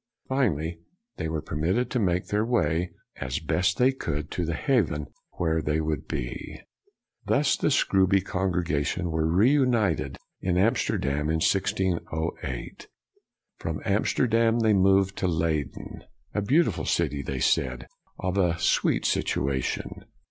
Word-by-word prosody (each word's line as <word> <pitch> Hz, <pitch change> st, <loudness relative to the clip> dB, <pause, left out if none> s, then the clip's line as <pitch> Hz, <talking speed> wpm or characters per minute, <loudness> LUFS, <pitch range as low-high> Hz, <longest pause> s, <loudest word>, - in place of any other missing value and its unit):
Finally, 85 Hz, -, 0 dB, 0.4 s
they -, -, -2 dB
were 80 Hz, -1 st, -3 dB
permitted 90 Hz, -, -1 dB
to 125 Hz, -, 0 dB
make 90 Hz, -3 st, +1 dB
their 105 Hz, +1 st, 0 dB
way, 90 Hz, -7 st, +1 dB, 0.3 s
as 65 Hz, 0 st, -3 dB
best 90 Hz, +3 st, 0 dB
they 125 Hz, +2 st, +4 dB
could, 75 Hz, -, -4 dB
to 90 Hz, -, -2 dB
the 80 Hz, 0 st, -2 dB
haven 80 Hz, -, +1 dB, 0.3 s
where 80 Hz, -2 st, 0 dB
they 75 Hz, +1 st, 0 dB
would 80 Hz, -1 st, -2 dB
be. -, -, -5 dB, 0.7 s
Thus -, -, +3 dB
the -, -, 0 dB
Scrooby 95 Hz, 0 st, +3 dB
congregation 90 Hz, -3 st, -1 dB
were 80 Hz, 0 st, +1 dB
reunited 120 Hz, -, +2 dB, 0.2 s
in 90 Hz, -1 st, 0 dB
Amsterdam 75 Hz, -, +1 dB
in 80 Hz, -, +1 dB
1608. 85 Hz, -7 st, -2 dB, 0.7 s
From 80 Hz, -1 st, -3 dB
Amsterdam, 115 Hz, +3 st, +2 dB
they 110 Hz, -1 st, +4 dB
moved 95 Hz, 0 st, +3 dB
to 95 Hz, -, 0 dB
Leyden: 80 Hz, -4 st, -2 dB
" -, -, -41 dB
a 105 Hz, -, 0 dB
beautiful 105 Hz, -, +2 dB
city," 70 Hz, -1 st, 0 dB
they 65 Hz, -1 st, -4 dB
said, 65 Hz, +1 st, +1 dB, 0.2 s
" -, -, -39 dB
of 95 Hz, +2 st, -1 dB
a 85 Hz, -3 st, +2 dB
sweet 85 Hz, -, +1 dB
situation. 65 Hz, -1 st, -1 dB
90 Hz, 135 wpm, -26 LUFS, 80-100 Hz, 0.7 s, they